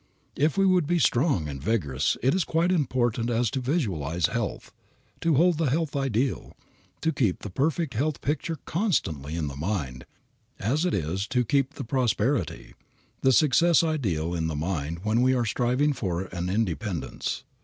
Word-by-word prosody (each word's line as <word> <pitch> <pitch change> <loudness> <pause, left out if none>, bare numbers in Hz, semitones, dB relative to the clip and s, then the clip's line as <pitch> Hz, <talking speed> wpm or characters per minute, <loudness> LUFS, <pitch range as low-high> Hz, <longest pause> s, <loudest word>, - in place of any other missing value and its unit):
If 150 +4 +1
we 195 - +4
would 180 -5 +3
be 175 +1 +2
strong 130 - +2
and 70 -2 -6
vigorous 75 - 0
it 130 +3 +4
is 185 - +2
quite 165 +3 +1
as - - +3
important 120 -6 0
to 120 +2 0
visualize 90 - 0
health, - - -3 0.5
to 165 -2 +2
hold 170 +2 +3
the 160 -5 +2
health 155 +2 -1
ideal, 135 -2 -1 0.5
to 160 - +1
keep 115 - 0
the 105 - -6
perfect 155 - 0
health 145 +6 -1
picture 155 +3 -2
constantly 80 - -1
in 85 -2 -1
the 70 -2 -5
mind, 70 -7 -3 0.5
as 140 - 0
it 180 - +1
is 95 +4 -2
to 125 -2 +1
keep 135 +3 +1
the - - -5
prosperity, 125 -2 -1 0.5
the 130 - +4
success 155 +6 +4
ideal 95 - -1
in 80 -2 -1
the 80 - -3
mind 80 0 -3
when 110 +3 +2
we 130 +1 +3
are 120 -2 +1
striving 125 +6 +1
for 95 -9 -2
an 90 0 -2
independence. 100 - -2
120 Hz, 170 wpm, -26 LUFS, -, 0.5 s, we